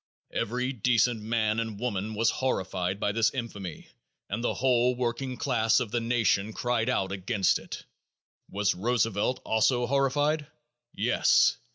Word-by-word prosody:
Every 125 +4 -1
decent 120 -1 +2
man 110 0 0
and 110 -3 -4
woman 110 -3 -3
was 115 +2 +2
"horrified" 95 -6 -2
by 105 - 0
this 115 +1 +2
infamy 100 -9 -6 0.4
and 115 +3 -2
the - - 0
whole 125 -1 +2
working 125 +1 -2
class 115 -5 +2
of 120 -5 -3
the 120 - +1
nation 115 -3 +1
cried 120 0 0
out 95 -6 0
against 100 +1 +1
it. - - -9 0.6
Was 100 0 +1
Roosevelt 115 +2 0
also 120 +3 +2
"horrified"? 145 +3 +1 0.4
Yes! - - +3
115 Hz, 140 wpm, -28 LUFS, 105-125 Hz, 0.6 s, Yes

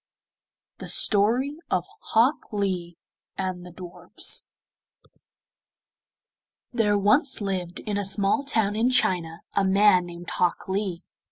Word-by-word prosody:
THE - - -8
STORY 245 +9 +3
OF 180 -1 0 0.3
HOK 245 +7 +2
LEE 185 -5 -3 0.4
AND 185 -2 -4
THE 180 - -11
DWARFS 175 0 -2 2.3
There 210 -4 +2
once 255 - +3
lived 190 -3 -4
in 205 -1 -3
a - - -2
small 200 +7 +1
town 220 -7 0
in 230 +3 +1
China 175 -9 0
a 200 - +1
man 190 -2 +4
named 175 0 -9
Hok 180 -1 -1
Lee. 190 -3 -3
195 Hz, 115 wpm, -24 LUFS, 180-215 Hz, 2.3 s, man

